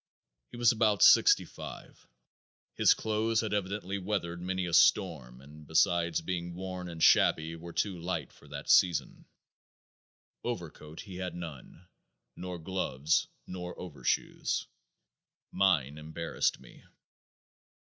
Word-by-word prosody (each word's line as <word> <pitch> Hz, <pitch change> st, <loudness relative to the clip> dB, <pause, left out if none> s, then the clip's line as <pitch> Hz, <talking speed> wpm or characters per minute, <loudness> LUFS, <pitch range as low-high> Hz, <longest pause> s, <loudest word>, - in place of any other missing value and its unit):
He -, -, -10 dB
was 120 Hz, -1 st, +5 dB
about 110 Hz, -4 st, +2 dB
65. -, -, +3 dB, 0.7 s
His -, -, +4 dB
clothes 110 Hz, +1 st, 0 dB
had 110 Hz, -2 st, -3 dB
evidently 100 Hz, 0 st, -2 dB
weathered 90 Hz, -3 st, -3 dB
many 95 Hz, +1 st, -2 dB
a 85 Hz, -, -5 dB
storm 65 Hz, -5 st, +3 dB
and 75 Hz, +2 st, -14 dB
besides 85 Hz, 0 st, +2 dB
being 85 Hz, 0 st, -4 dB
worn 90 Hz, -1 st, -6 dB
and 80 Hz, -1 st, -4 dB
shabby 80 Hz, +1 st, +4 dB
were 85 Hz, +1 st, -9 dB
too 95 Hz, 0 st, -2 dB
light 90 Hz, +2 st, -3 dB
for -, -, -19 dB
that 70 Hz, 0 st, -8 dB
season. 90 Hz, -2 st, +3 dB, 1.2 s
Overcoat 75 Hz, +1 st, -6 dB
he 95 Hz, -3 st, -10 dB
had 90 Hz, -1 st, -4 dB
none. 85 Hz, 0 st, -9 dB, 0.5 s
Nor 90 Hz, -1 st, -6 dB
gloves, 80 Hz, -4 st, -1 dB, 0.2 s
nor 90 Hz, -1 st, -7 dB
overshoes. 85 Hz, -6 st, -2 dB, 0.9 s
Mine 75 Hz, -7 st, +1 dB
embarrassed 80 Hz, +2 st, -2 dB
me. -, -, -17 dB
90 Hz, 120 wpm, -30 LUFS, 80-95 Hz, 1.2 s, was